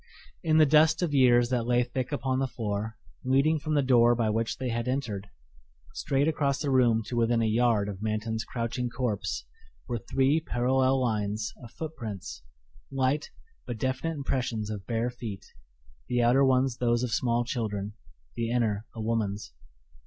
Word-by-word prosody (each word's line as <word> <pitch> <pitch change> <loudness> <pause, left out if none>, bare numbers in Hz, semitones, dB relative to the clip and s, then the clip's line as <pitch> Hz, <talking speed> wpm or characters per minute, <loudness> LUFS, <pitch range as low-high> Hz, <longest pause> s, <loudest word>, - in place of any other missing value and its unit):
In 160 -2 +2
the 155 - +7
dust 155 +3 +4
of 160 -4 -1
years 120 -3 +5
that 120 -2 0
lay 125 0 +3
thick 125 +2 -4
upon 130 -2 -1
the 135 - +1
floor 110 -2 -4 0.3
leading 140 +5 +3
from 155 +1 -2
the 145 - +3
door 120 -2 +5
by 115 -2 +1
which 115 +1 -1
they 130 -1 -3
had 115 +1 -2
entered, 115 -7 -2 0.7
straight 140 +2 0
across 140 -3 +1
the 145 -3 -1
room 120 -4 +3
to 120 - -5
within 115 0 +2
a - - +2
yard 110 -2 +2
of 100 -1 -6
Manton's 110 +1 -2
crouching 120 +1 -3
corpse 115 -4 -2 0.4
were 120 -2 -2
three 135 +8 +2
parallel 130 -1 +1
lines 105 -3 -1
of 120 - -10
footprints 110 - -6 0.5
light 135 +3 0 0.4
but 120 - -4
definite 130 +7 -2
impressions 120 -6 -2
of 100 -3 -6
bare 115 +1 -1
feet, 110 -5 -7 0.6
the 125 0 0
outer 125 +4 +5
ones 130 -2 +2
those 120 0 +1
of 125 - -2
small 120 0 +1
children, 105 -5 -3 0.4
the 115 -1 -2
inner 110 -3 0
a 115 - -5
woman's. 105 - -2
120 Hz, 165 wpm, -28 LUFS, 110-130 Hz, 0.7 s, the